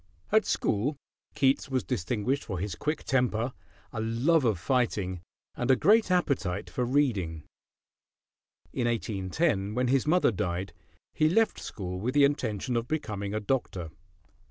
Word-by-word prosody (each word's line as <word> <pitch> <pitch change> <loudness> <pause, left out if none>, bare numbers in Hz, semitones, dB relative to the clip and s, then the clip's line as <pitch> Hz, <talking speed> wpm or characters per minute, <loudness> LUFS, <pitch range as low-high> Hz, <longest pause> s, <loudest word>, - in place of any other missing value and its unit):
At 220 0 +4
school 130 +8 0 0.4
Keats 135 0 +2
was 130 -3 0
distinguished 120 +11 -1
for 95 - -4
his 95 +1 -3
quick 150 - -2
temper, 125 -2 +1 0.4
a 110 - -2
love 125 +7 +2
of 110 -5 +2
fighting, 100 -5 0 0.3
and 125 - -3
a 130 - +7
great 215 - +4
appetite 135 - 0
for 125 - -1
reading. 105 - 0 1.3
In 120 -2 0
1810, 105 - -1
when 125 0 +1
his 135 +1 +2
mother 175 -4 +4
died, 90 -1 -3 0.4
he 155 - +3
left 225 +6 +2
school 90 -3 -5
with 125 +7 -2
the 145 - +6
intention 125 -5 0
of 115 0 -1
becoming 105 -9 -3
a - - +1
doctor. 100 -8 -2
120 Hz, 145 wpm, -28 LUFS, 100-140 Hz, 1.3 s, a